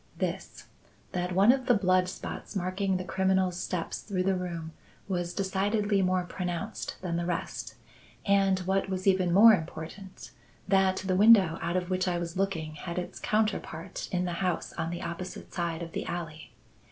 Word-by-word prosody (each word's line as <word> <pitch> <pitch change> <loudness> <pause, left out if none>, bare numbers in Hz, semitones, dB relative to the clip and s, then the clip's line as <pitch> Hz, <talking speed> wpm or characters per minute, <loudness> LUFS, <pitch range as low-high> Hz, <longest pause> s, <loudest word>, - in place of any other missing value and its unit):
"This: - - -4 0.5
that 180 0 -2
one 200 +5 +7
of 260 0 -1
the 245 - +5
blood 185 -2 +3
spots 190 - -7
marking 190 +1 0
the 185 - -4
criminal's 190 -1 +1
steps 180 -3 -3
through 190 -3 -2
the 195 +1 +2
room 170 -3 -4 0.4
was 175 -3 -2
decidedly 200 +2 +1
more 185 -1 +2
pronounced 180 +3 -4
than 170 -2 -1
the 170 - -1
rest; 175 - -4 0.5
and, 195 -1 +4
what 190 +1 0
was 185 -1 -3
even 185 -2 +3
more 215 +5 +9
important, 175 +2 -5 0.4
that 190 -1 +3
the 185 -1 +1
window 200 -4 +6
out 170 +2 0
of 180 0 -3
which 185 0 +1
I 175 -1 +1
was 170 -1 -4
looking 170 -5 -1
had 170 +3 -6
its 180 - -4
counterpart 210 -5 -2
in 180 -1 0
the 175 - -2
house 180 -2 -1
on 165 -1 -3
the 175 0 -5
opposite 170 +2 -6
side 170 -1 -2
of 165 - -7
the - - -4
alley. 165 -3 -5
185 Hz, 175 wpm, -29 LUFS, 175-195 Hz, 0.5 s, more